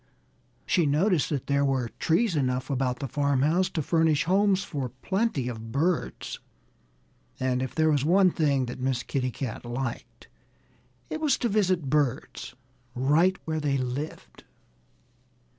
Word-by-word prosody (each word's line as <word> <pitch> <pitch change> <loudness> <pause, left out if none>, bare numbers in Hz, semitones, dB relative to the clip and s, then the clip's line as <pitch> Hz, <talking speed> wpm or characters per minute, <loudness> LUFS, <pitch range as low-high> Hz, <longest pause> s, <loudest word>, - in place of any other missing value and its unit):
She 170 -5 +2
noticed 160 +3 +2
that 140 -4 -2
there 140 0 +1
were 130 -4 0
trees 175 +3 +2
enough 130 -1 -1
about 125 -2 0
the 135 - -4
farmhouse 145 +7 +1
to 155 - -2
furnish 160 -1 +2
homes 195 +1 +2
for 135 -4 -4
plenty 170 - -1
of 115 -2 -6
birds. 160 +6 -1 1.0
And 130 -1 0
if 130 - -4
there 155 -1 +3
was 145 -3 +2
one 185 +4 +4
thing 140 -5 +1
that 125 +1 -7
Miss 130 -2 -1
Kitty 130 -2 -1
Cat 125 -2 -5
liked 120 0 -5 0.8
it 315 - -3
was 300 -3 +2
to 240 - -1
visit 185 -7 +1
birds 145 -5 -1 0.4
right 155 +9 +3
where 160 -1 -1
they 145 -2 0
lived. 130 +4 -5
145 Hz, 140 wpm, -27 LUFS, 130-170 Hz, 1.0 s, one